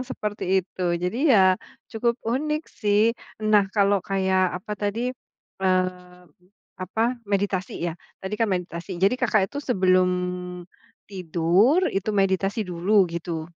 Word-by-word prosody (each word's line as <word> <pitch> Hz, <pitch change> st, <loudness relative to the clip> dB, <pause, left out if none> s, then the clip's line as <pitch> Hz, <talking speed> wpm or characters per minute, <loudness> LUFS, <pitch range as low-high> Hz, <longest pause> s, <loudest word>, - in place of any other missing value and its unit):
seperti 215 Hz, -5 st, -4 dB, 0.2 s
itu. 185 Hz, -, -8 dB
Jadi 225 Hz, -, 0 dB
ya, 190 Hz, -6 st, +5 dB, 0.3 s
cukup 235 Hz, +1 st, 0 dB
unik 300 Hz, +7 st, -1 dB, 0.2 s
sih. 210 Hz, +2 st, +3 dB, 0.4 s
Nah, 205 Hz, -1 st, +6 dB
kalau 200 Hz, -1 st, +2 dB
kayak 190 Hz, 0 st, +1 dB, 0.2 s
apa 210 Hz, -, -5 dB
tadi, 230 Hz, +5 st, -1 dB, 0.5 s
eee, 185 Hz, -1 st, -1 dB, 0.6 s
apa, 210 Hz, +5 st, -2 dB, 0.3 s
meditasi 195 Hz, -2 st, -1 dB
ya, 170 Hz, -, -2 dB, 0.3 s
tadi 190 Hz, +2 st, -4 dB
kan 225 Hz, -, +3 dB
meditasi. 180 Hz, 0 st, -4 dB
Jadi 200 Hz, +5 st, +4 dB
Kakak 215 Hz, -5 st, +3 dB
itu, 285 Hz, -, -4 dB
sebelum 185 Hz, -7 st, +3 dB, 0.9 s
tidur, 185 Hz, -, +2 dB
itu 195 Hz, +2 st, -2 dB
meditasi 195 Hz, +2 st, +1 dB
dulu, 185 Hz, +3 st, +2 dB
gitu. 165 Hz, -1 st, -4 dB
195 Hz, 125 wpm, -24 LUFS, 185-220 Hz, 0.9 s, Nah